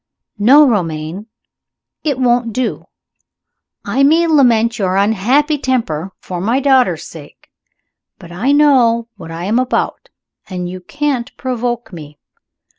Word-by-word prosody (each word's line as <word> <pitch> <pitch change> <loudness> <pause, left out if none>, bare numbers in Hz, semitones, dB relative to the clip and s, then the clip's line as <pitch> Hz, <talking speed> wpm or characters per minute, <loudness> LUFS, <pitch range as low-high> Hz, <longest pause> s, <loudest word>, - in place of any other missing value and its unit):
"No, 280 +8 +6
Romayne, 170 -2 -2 0.8
it 285 -4 -1
won't 240 -2 +1
do. 250 +1 -3 1.0
I 270 - -1
may 320 +5 +4
lament 240 -7 +3
your 185 -2 0
unhappy 245 +10 +1
temper, 195 - -2
for 180 -2 -6
my 230 +7 +1
daughter's 265 -2 +2
sake - - -13 0.7
but 175 -3 -13
I 210 +11 -1
know 250 -6 +3
what 165 -4 -10
I 165 +2 -6
am 220 +5 +1
about, 255 0 -2 0.4
and 180 -2 -4
you 185 +1 -7
can't 280 +3 -3
provoke 240 -3 -3
me. 150 -3 -11
235 Hz, 125 wpm, -16 LUFS, 185-265 Hz, 1.0 s, No